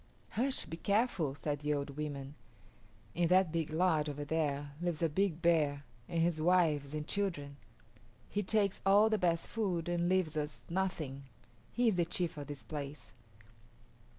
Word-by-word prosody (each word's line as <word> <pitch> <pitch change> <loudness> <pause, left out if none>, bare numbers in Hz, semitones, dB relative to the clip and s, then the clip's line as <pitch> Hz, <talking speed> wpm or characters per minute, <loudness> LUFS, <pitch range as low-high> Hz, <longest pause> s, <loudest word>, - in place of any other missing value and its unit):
"Hush; 260 +4 0
be 165 +1 -6
careful," 200 - +1
said 145 0 -2
the 150 0 0
old 140 0 -3
women. 140 -1 -5 0.8
"In 175 0 +2
that 185 -1 +4
big 165 -2 -1
lodge 160 -2 +2
over 145 0 -4
there 145 -2 -1
lives 175 -2 -1
a 165 - +3
big 175 +1 0
bear 150 -4 +3 0.3
and 170 - -1
his 165 -1 +1
wives 155 -5 +2
and 150 0 -3
children. 155 -9 -2 0.7
He 205 - -1
takes 200 -1 +2
all 205 +3 +5
the 215 - +2
best 170 -2 +1
food 185 -7 -1
and 175 0 +1
leaves 185 -4 +1
us 150 -1 -4
nothing. 160 -7 -2 0.5
He 240 -1 +3
is 195 - 0
the 175 - +3
chief 170 0 -1
of 145 -1 -7
this 145 -2 -7
place." 145 -1 -6
165 Hz, 165 wpm, -34 LUFS, 145-185 Hz, 0.8 s, all